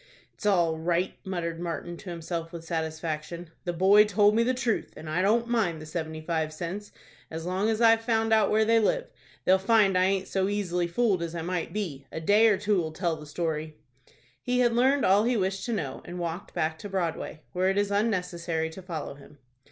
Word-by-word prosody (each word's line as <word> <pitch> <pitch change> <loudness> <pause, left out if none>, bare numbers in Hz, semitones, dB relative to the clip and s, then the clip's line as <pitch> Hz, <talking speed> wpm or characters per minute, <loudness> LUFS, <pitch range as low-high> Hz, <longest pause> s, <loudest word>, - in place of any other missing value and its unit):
"It's 210 - -4
all 170 -5 +2
right!" 175 +3 0
muttered 170 -4 -3
Martin 170 0 -4
to 185 - -10
himself 165 -1 -4
with 170 -2 -8
satisfaction. 160 0 -4
"The 175 - -1
boy 195 +4 +6
told 210 0 +4
me 225 - +3
the 255 +2 +1
truth, 245 -4 -1
and 160 - -9
I 155 +4 0
don't 230 +5 +2
mind 210 -9 0
the 155 - -9
seventy 160 -1 -5
five 160 -1 -1
cents, 180 +6 -6 0.4
as 160 +1 -6
long 190 +4 0
as 220 +1 0
I've 225 -1 +6
found 225 -1 +1
out 215 -3 +4
where 220 +1 +3
they 230 +1 +4
live. - - 0 0.3
They'll 190 +1 +5
find 205 -1 +4
I 185 0 +4
aint 190 0 0
so 190 -1 0
easily 180 -4 -1
fooled 195 0 +1
as 170 0 -4
I 165 - -3
might 180 0 -2
be. 155 -10 -4
A - - -4
day 205 +7 +5
or 210 -3 +4
two'll 185 -7 0
tell 170 -1 -1
the 150 -1 -11
story." 155 -1 -3 0.6
He 250 0 +1
had 240 -1 +3
learned 265 +4 +3
all 200 +3 +5
he 245 0 +2
wished 190 0 -1
to - - -2
know, 150 - -3
and 180 - -8
walked 170 +1 -5
back 160 0 -1
to 205 - -7
Broadway, 170 -4 -3
where 185 +1 +2
it 195 - 0
is 205 0 +1
unnecessary 180 -6 -1
to 190 - -9
follow 170 -6 -5
him. 145 +1 -16
185 Hz, 215 wpm, -27 LUFS, 165-210 Hz, 0.6 s, boy